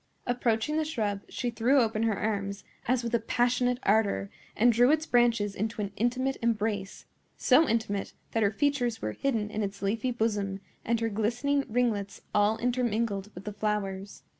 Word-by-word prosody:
Approaching 245 +3 0
the 315 - +2
shrub, 210 -10 -2
she 245 -2 -2
threw 240 +5 +3
open 225 -2 +1
her 225 -3 +1
arms, 200 -2 -2 0.2
as 250 0 +2
with 235 0 -3
a 235 - +4
passionate 245 +2 +1
ardor, 200 - +2 0.3
and 240 +2 +5
drew 245 +3 +5
its 310 +1 +3
branches 235 -6 +2
into 220 +3 -3
an 200 -1 -2
intimate 255 +3 0
embrace—so 225 +6 0
intimate 220 -3 -1 0.2
that 225 - 0
her 205 - +4
features 245 0 0
were 110 - -2
hidden 220 - -1
in 215 - -2
its 200 -1 -3
leafy 220 +5 0
bosom 210 -5 -1 0.2
and 230 0 0
her 225 - +1
glistening 240 +7 0
ringlets 215 -4 -1
all 210 +2 +3
intermingled 230 -5 -1
with 180 - -8
the 210 - -5
flowers. 200 -2 -3
225 Hz, 165 wpm, -29 LUFS, 205-245 Hz, 0.3 s, and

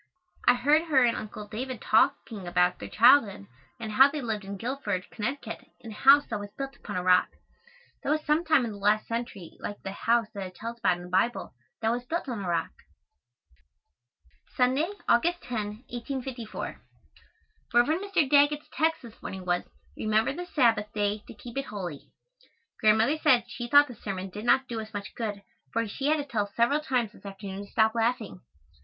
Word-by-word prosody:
I 245 - +7
heard 295 +6 +3
her 280 -6 +4
and 235 -1 +3
Uncle 210 0 -7
David 245 +3 -5
talking 215 -3 +1
about 180 +1 +2
their - - -7
childhood 230 - +5 0.3
and 220 -2 -5
how 265 +6 +7
they 300 +1 -4
lived 220 -5 -3
in 200 +1 -6
Guilford, 215 -5 -3
Conn., 240 +6 -2 0.4
in 225 - -10
a - - -7
house 275 +6 +6
that 215 - -4
was 205 0 -7
built 275 0 -5
upon - - -8
a 180 - -1
rock. 180 0 +4 0.7
That - - -4
was 305 +1 0
some 305 +3 +2
time 315 -6 +3
in 225 - -4
the 205 - -8
last 210 +2 +2
century 230 -7 -5
like 205 - -6
the 195 - -4
house 230 +3 +1
that 200 - -6
it 185 - -14
tells 230 +2 -7
about 185 -6 +2
in 175 - -10
the 180 - -10
Bible 190 +6 0 0.3
that 225 - +3
was 245 +1 -2
built 325 +6 -3
on 230 -6 -4
a 180 - -3
rock. 170 - 0 1.9
Sunday, 260 +7 +2 0.2
August 335 +6 +2
10, 220 -2 -4
1854. 245 -2 -5 0.9
Rev. 240 0 +5 0.2
Mr. 385 -7 +1
Daggett's 290 +2 +3
text 320 -1 +1
this 230 -2 -13
morning 190 -1 -7
was, 175 0 0 0.3
"Remember 220 +3 +1
the 355 +4 -6
Sabbath 230 -9 +2
day 205 0 0
to - - -9
keep 240 +4 -6
it 275 - -4
holy." 180 - -7 0.7
Grandmother 220 +8 +3
said 250 -5 +4
she 240 0 -5
thought 285 +2 +7
the 250 - -9
sermon 195 -4 -5
did 210 +4 -7
not 265 +2 +4
do 230 -2 -4
us 215 0 -10
much 200 -1 -6
good 210 -3 -4 0.3
for 230 0 0
she 270 +7 -3
had 310 +1 +3
to 290 - -3
tell 225 -7 -1
us 200 - -26
several 240 +6 +3
times 250 -7 -1
this - - -19
afternoon 195 0 -7
to - - -22
stop 220 0 +3
laughing. 230 - -1
230 Hz, 195 wpm, -28 LUFS, 205-270 Hz, 1.9 s, I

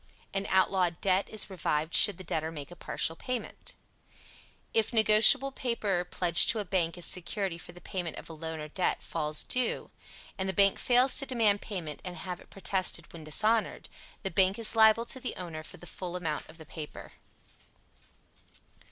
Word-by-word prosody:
An 195 0 -2
outlawed 185 -2 +2
debt 190 0 +1
is 215 - 0
revived 160 -4 -2
should 205 -5 +9
the 185 - -9
debtor 160 -2 -3
make 150 0 -9
a - - -10
partial 165 - -2
payment. 250 +7 -5 1.0
If 225 +1 +1
negotiable 220 +5 +6
paper, 215 -9 -2
pledged 170 -2 +3
to 230 - +3
a 205 - -4
bank 175 -3 -1
as 175 - -3
security 180 0 0
for - - -9
the 175 - -14
payment 175 -4 -4
of - - -9
a 165 - -9
loan 160 0 -6
or 150 - -6
debt, 180 +4 -2
falls 150 -2 -1
due, 250 -1 0 0.5
and 190 0 -1
the - - -1
bank 195 +1 +3
fails 250 +2 +3
to 275 - +1
demand 220 -5 +2
payment 170 -8 -6
and 180 -1 -7
have 180 -2 -6
it - - -18
protested 190 -1 -2
when 160 -2 -10
dishonored, 215 +8 0 0.3
the 195 - -3
bank 190 +2 +2
is 230 0 -1
liable 220 +1 +5
to 260 - 0
the 255 - -6
owner 170 -4 -7
for 155 - -12
the 175 - -13
full 175 +1 -7
amount 160 -5 -4
of 160 - -14
the 160 - -12
paper. 150 -1 -9
185 Hz, 185 wpm, -29 LUFS, 165-215 Hz, 1.0 s, should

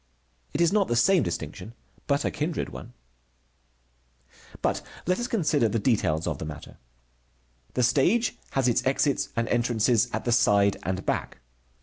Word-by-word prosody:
It 160 - +1
is 170 +2 +3
not 205 -3 +3
the 120 - 0
same 180 +9 +4
distinction, 90 +7 -5 0.3
but 140 0 +1
a - - 0
kindred 155 +2 -3
one. - - -10 1.7
But - - 0 0.2
let 180 +4 +1
us 240 - -2
consider 155 - +1
the 105 - 0
details 100 -9 +1
of - - -3
the - - -5
matter. 75 -1 -9 1.0
The 125 - +2
stage 170 - +2 0.2
has 135 -2 +1
its 120 - +2
exits 135 +1 +1
and 115 -1 0
entrances 120 0 +2
at - - -3
the 120 - +1
side 100 -4 +3
and 95 +2 -3
back. - - -2
120 Hz, 155 wpm, -26 LUFS, 105-155 Hz, 1.7 s, same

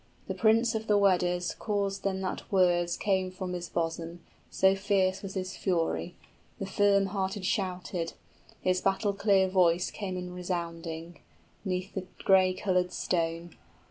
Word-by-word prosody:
The - - -2
prince 230 +2 +3
of 220 0 -3
the 210 - +4
Weders 180 -3 +2
Caused 200 -2 -2
then 190 -1 -1
that 185 - -4
words 175 -2 +3
came 190 -2 +1
from 185 0 -5
his 175 -1 -5
bosom, 165 0 -3 0.3
So 190 0 +4
fierce 195 -1 +1
was 195 -1 -7
his 185 -1 -3
fury; 175 -1 -1 0.4
the 195 - -4
firm 200 0 +3
hearted 190 0 -2
shouted: 180 -3 -2 0.5
His 185 0 +1
battle 195 +1 +1
clear 200 -1 +3
voice 180 -2 +3
came 190 -3 -4
in 180 0 -6
resounding 170 -2 -4
90 170 +1 -15 0.4
'Neath 185 0 -2
the 185 -1 -4 0.2
gray 185 -1 +5
colored 180 -2 0
stone. 170 -1 -2
185 Hz, 150 wpm, -29 LUFS, 175-195 Hz, 0.5 s, gray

